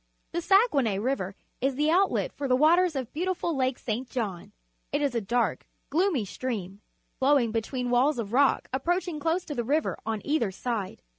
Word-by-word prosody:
The 345 - -2
Saguenay 310 - +3
River 200 -4 -2 0.3
is 270 +1 +1
the 300 +3 +2
outlet 380 +3 +2
for 280 - -3
the 255 - +4
waters 335 +4 +4
of 260 -3 -4
beautiful 345 0 -1
Lake 260 -1 0
St. 245 +2 -4
John. 205 -9 -4 0.4
It - - +1
is 285 -3 0
a 235 - 0
dark, 235 +4 -1 0.2
gloomy 320 - +2
stream, 200 -3 -5 0.4
flowing 265 -4 +3
between 245 +2 -2
walls 260 +4 +3
of 225 -2 -4
rock 275 +2 +3
approaching 345 +4 -1
close 330 +4 0
to 295 - -5
the 240 -4 -2
river 295 +6 0
on 220 -1 -3
either 285 -8 +1
side. 205 0 -4
265 Hz, 175 wpm, -27 LUFS, 230-310 Hz, 0.4 s, the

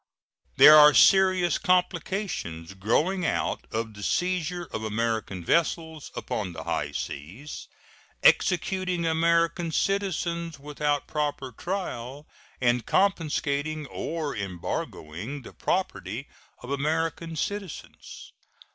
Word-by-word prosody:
There 150 - +10
are 150 0 +8
serious 185 -2 +5
complications 180 - -1
growing 150 - +1
out - - -1
of 110 0 -3
the 105 - -11
seizure 180 - -1
of 110 - -3
American 110 -4 -2
vessels 160 - 0
upon 105 -8 -3
the - - -7
high - - -2
seas, 100 - -7 0.6
executing 180 -1 +2
American 165 +1 +2
citizens 170 -4 -1
without 145 0 -2
proper 145 -3 -2
trial, 145 - -5 0.3
and 120 -1 +2
confiscating 155 - 0
or 155 +2 -4
embargoing 95 - -5
the - - -11
property 135 - -2 0.4
of 125 - -7
American 160 +3 -1
citizens. 195 +2 -6
150 Hz, 100 wpm, -26 LUFS, 120-175 Hz, 0.6 s, There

